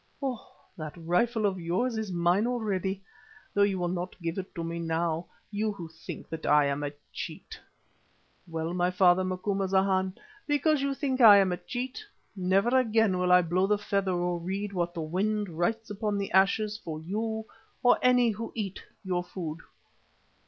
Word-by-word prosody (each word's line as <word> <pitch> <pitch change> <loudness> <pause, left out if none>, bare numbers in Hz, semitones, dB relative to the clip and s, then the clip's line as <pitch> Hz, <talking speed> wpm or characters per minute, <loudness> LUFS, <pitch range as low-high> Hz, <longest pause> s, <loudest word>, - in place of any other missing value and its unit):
Oh! 265 -5 -4 0.3
that 155 -2 -6
rifle 210 +7 +1
of 190 -2 0
yours 185 +9 0
is 220 -3 -3
mine 175 +5 +2
already, 195 -5 -2 0.5
though 205 - +2
you 200 -1 +3
will 175 -1 -1
not 180 +1 -4
give 170 +1 -3
it 190 - -8
to 170 - -3
me 165 0 -4
now, 165 0 -1 0.2
you 215 +1 0
who 170 -5 -8
think 160 - -9
that 160 0 -6
I 150 0 +5
am 140 +1 -1
a 145 -1 -2 0.2
cheat. - - -7 0.9
Well, 165 0 -3
my 180 0 +1
father 185 0 +4
Macumazana, 190 0 +1 0.3
because 290 0 +2
you 275 0 0
think 265 -2 -1
I 210 -3 +10
am 195 -2 +4
a 180 - -1
cheat, 255 - -5 0.3
never 190 +4 +2
again 225 -6 +3
will 180 0 +2
I 180 0 +7
blow 180 +3 +1
the 210 0 +3
feather 195 -2 0
or 175 0 -1
read 195 +4 -3
what 175 -1 -1
the 165 - -3
wind 205 +5 -1
writes 205 +7 -2
upon 205 0 -1
the 200 0 -3
ashes 210 +3 +3
for 155 -2 -5
you 220 +6 -3 0.4
or 245 - +5
any 250 -2 +4
who 225 +2 -5
eat 200 -4 -4 0.2
your 180 -2 -1
food." 165 -3 -6
190 Hz, 175 wpm, -28 LUFS, 175-215 Hz, 0.9 s, I